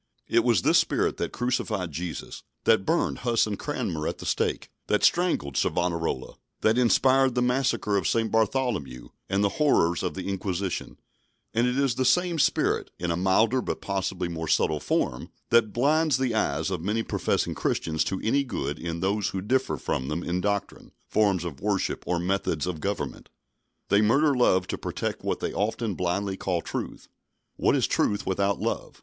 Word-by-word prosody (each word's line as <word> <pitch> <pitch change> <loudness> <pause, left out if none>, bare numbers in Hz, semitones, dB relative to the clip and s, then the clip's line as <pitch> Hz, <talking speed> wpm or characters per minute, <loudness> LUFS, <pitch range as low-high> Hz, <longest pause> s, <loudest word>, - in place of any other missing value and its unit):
It 115 0 +3
was 115 -7 +3
this - - +5
spirit - - 0
that - - -2
crucified 110 -7 -2
Jesus; 85 +1 -6 0.2
that 110 -4 +3
burned 170 - +1
Huss 120 -2 +2
and 105 -2 -4
Cranmer 105 - -3
at - - -3
the - - -9
stake; - - -1 0.2
that 105 - +1
strangled 170 - +2
Savonarola; 85 -7 -1 0.2
that 110 +1 +3
inspired 130 +1 +4
the 125 - +2
massacre 125 -5 +1
of 95 - 0
St. 115 -1 +1
Bartholomew 110 - -1 0.2
and 100 +1 +1
the 100 +8 -1
horrors 85 - +3
of - - -3
the 95 -1 -5
Inquisition; 95 -1 -3 0.6
and 115 +2 +2
it 125 +1 0
is 135 -3 +2
the 130 - -1
same 175 +5 +2
spirit, - - +1
in 85 -1 -2
a - - 0
milder 105 +8 +3
but - - -3
possibly 95 -2 -2
more 80 -1 -4
subtle 75 0 +2
form, 60 - -1 0.2
that 115 -2 +4
blinds 150 +5 +2
the 130 -3 0
eyes 80 -4 0
of 90 - -2
many 105 +5 -1
professing - - -1
Christians 80 -1 -1
to 95 - -2
any 140 +5 +2
good 75 - -4
in 85 -1 -4
those 100 +2 0
who 95 - -3
differ 105 - 0
from 65 0 -2
them 75 +4 -3
in 90 +1 -1
doctrine, 100 0 -3
forms 100 -5 +2
of 75 -6 -6
worship 100 -2 -1
or 90 - +1
methods 90 -3 -1
of 90 -3 -3
government. 100 +4 -4 0.6
They 100 - +4
murder 140 +8 +4
love 95 -8 +3
to - - -3
protect - - -4
what - - -2
they - - -2
often 110 +1 -1
blindly 95 +2 -1
call 90 -3 -1
truth. - - -5 0.5
What - - +2
is - - +2
truth 105 0 0
without 100 +1 0
love? - - -3
100 Hz, 180 wpm, -26 LUFS, 90-120 Hz, 0.6 s, this